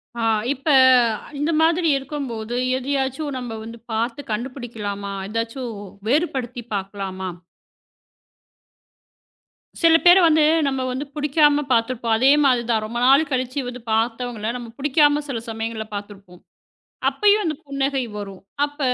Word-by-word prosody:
ஆ, 235 - -4 0.3
இப்ப 275 +4 -13 0.7
இந்த 300 +3 0
மாதிரி 330 0 +3
இருக்கும்போது, 250 -5 -5 0.2
எதையாச்சும் 270 +2 -2
நம்ப 245 -3 -5
வந்து 230 +1 -9
பாத்து 235 +5 -2
கண்டுபிடிக்கலாமா? 215 -4 -5 0.2
எதாச்சும் 230 +2 -4 0.3
வேறுபடுத்தி 255 -4 -1
பாக்கலாமா? 195 -1 -4 2.5
சில 330 -1 +6
பேர 350 +2 +9
வந்து 315 -2 +4 0.2
நம்ம 265 -1 -1
வந்து 260 +4 -4
புடிக்காம 295 0 +3
பாத்திருப்போம். 230 -1 +1
அதே 265 +4 +5
மாதிரிதான். 235 -4 +2
ரொம்ப 235 +2 -4
நாள் 275 +3 +5
கழிச்சு 255 +2 -1
வந்து 250 -1 -7
பாத்தவங்கள, 225 0 -1
நம்ம 240 -2 -8
புடிக்காம 290 +1 +3
சில 235 -4 -3
சமயங்கள்ல 225 -1 -4
பாத்திருப்போம். 200 -3 -10 0.7
அப்பயும் 420 0 +3
அந்தப் 310 -4 -3
புன்னகை 275 -1 -1 0.2
வரும். 195 -2 -8 0.2
அப்ப 290 +1 -7
250 Hz, 115 wpm, -22 LUFS, 225-285 Hz, 2.5 s, பேர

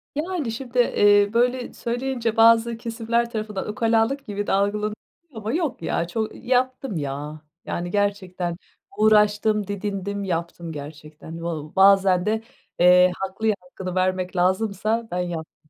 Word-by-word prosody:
Yani, 310 -4 -2
şimdi, 245 +1 -4
eee, 205 -3 +4
böyle 245 +1 +1
söyleyince 240 -1 -2
bazı 230 0 +5
kesimler 235 0 -1
tarafından 215 -3 -4
ukalalık 225 +5 +1
gibi 205 -2 -4
de - - 0
algılanıyor 210 +2 +1 0.4
ama 220 -1 -4
yok 320 - -2
ya. 170 +1 -1
Ço 175 +6 -4
ııı, 220 - -4
yaptım, 255 -3 -1
ya. 145 +1 -5 0.2
Yani, 175 0 -4
gerçekten 185 -4 -1 0.4
uğraştım, 210 -1 +3
didindim, 200 0 -3
yaptım. 170 -2 -4
Gerçekten 155 +2 -9
va 170 0 -2
ııı, 150 +1 -11
bazen 190 -1 +5
de, 220 +1 0 0.4
eee, 180 +1 +6
haklıya 205 +3 -1
hakkını 180 0 -7
vermek 185 0 0
lazımsa 210 +5 0
ben 180 - -2
yaptım. 160 -3 -6
205 Hz, 140 wpm, -23 LUFS, 180-230 Hz, 0.4 s, eee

